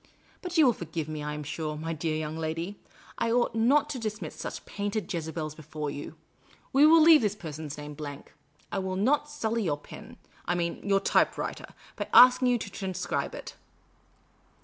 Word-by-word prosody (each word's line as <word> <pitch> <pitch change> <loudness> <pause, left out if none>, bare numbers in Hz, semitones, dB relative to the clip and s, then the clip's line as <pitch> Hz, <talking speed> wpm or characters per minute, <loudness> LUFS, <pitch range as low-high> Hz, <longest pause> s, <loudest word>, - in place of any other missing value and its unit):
But 360 -1 -4
you 315 - +7
will 245 - +5
forgive 165 -4 -5
me, 155 -1 -5
I 150 0 -4
am 150 - -5
sure, 155 +1 -4
my 165 +2 -3
dear 155 0 -2
young 155 0 -3
lady; 165 +5 -4 0.4
I 230 0 +1
ought 240 0 +2
not 255 +7 +3
to 265 - -4
discuss 215 -1 -4
such - - -7
painted 205 0 -3
Jezebels 160 -2 -4
before 155 -1 -5
you. 145 - -7 0.6
We 285 +3 +7
will 325 +1 +7
leave 320 -1 +8
this 210 -2 0
person's 155 -6 -7
name 150 0 -7
blank. 145 -1 -8 0.4
I 195 - -1
will 190 -1 -3
not 285 +9 +2
sully 230 -6 -1
your 155 -8 0
pen 145 - -12
— - - -28
I 175 - +1
mean, 170 -1 -2
your 195 0 +2
typewriter - - 0 0.2
— - - -22
by - - -3
asking 250 +1 +8
you 245 -1 +3
to 210 - -6
transcribe 185 -3 -3
it." - - -8
185 Hz, 195 wpm, -28 LUFS, 155-230 Hz, 0.6 s, leave